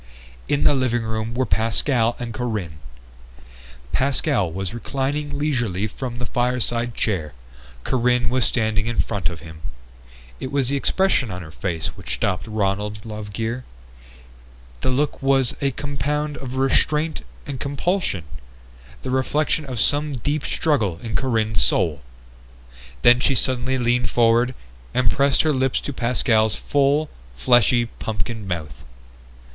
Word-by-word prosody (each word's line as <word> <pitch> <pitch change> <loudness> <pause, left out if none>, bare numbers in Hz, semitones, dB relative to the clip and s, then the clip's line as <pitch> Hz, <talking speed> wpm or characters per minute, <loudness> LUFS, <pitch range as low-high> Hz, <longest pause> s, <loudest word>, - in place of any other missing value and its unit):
In 145 - +1
the 145 - +5
living 125 -3 +1
room 110 +1 -3
were 130 +1 +1
Pascal 115 +1 +2
and 120 -2 -5
Corinne. 105 -11 -3 1.1
Pascal 130 - +1
was 95 +4 -4
reclining 140 +5 -2
leisurely 120 -10 0 0.2
in 125 -2 -3
the 120 - -3
fireside 120 -1 0
chair; 85 - -1 0.5
Corinne 125 -1 +2
was 130 -1 +2
standing 110 -2 0
in 120 - -2
front 100 -5 0
of 85 -2 -8
him. 80 -1 -11 0.8
It 130 - -5
was 140 -3 +1
the 140 - +1
expression 145 - +2
on 90 -1 -5
her 80 - -11
face 80 -1 -3
which - - -4
stopped 95 +4 -1
Ronald 105 0 -1
Lovegear. 110 +3 -4 1.2
The - - 0
look 140 +4 0
was 135 -2 +3
a 140 - +2
compound 145 +2 -2
of 130 -1 -6
restraint 150 +4 +1 0.2
and 140 -3 -5
compulsion, 145 - -1 0.8
the - - -3
reflection 145 +4 +1
of 130 -4 -4
some 145 +4 +3
deep 145 +5 -1
struggle 110 - 0
in 115 -1 -3
Corinne's 110 - +1
soul. 75 +2 +2 1.0
Then 120 +1 +7
she 135 +1 +2
suddenly 130 +2 0
leaned 125 0 +1
forward 120 +2 +3 0.4
and 125 -1 +3
pressed 140 0 +3
her 155 -1 +2
lips 130 -1 +1
to 140 - -4
Pascal's 115 -3 +2
full, 145 +2 +2 0.3
fleshy 120 - +4
pumpkin 110 -1 -5
mouth. 75 -8 -5
120 Hz, 135 wpm, -22 LUFS, 110-135 Hz, 1.2 s, Then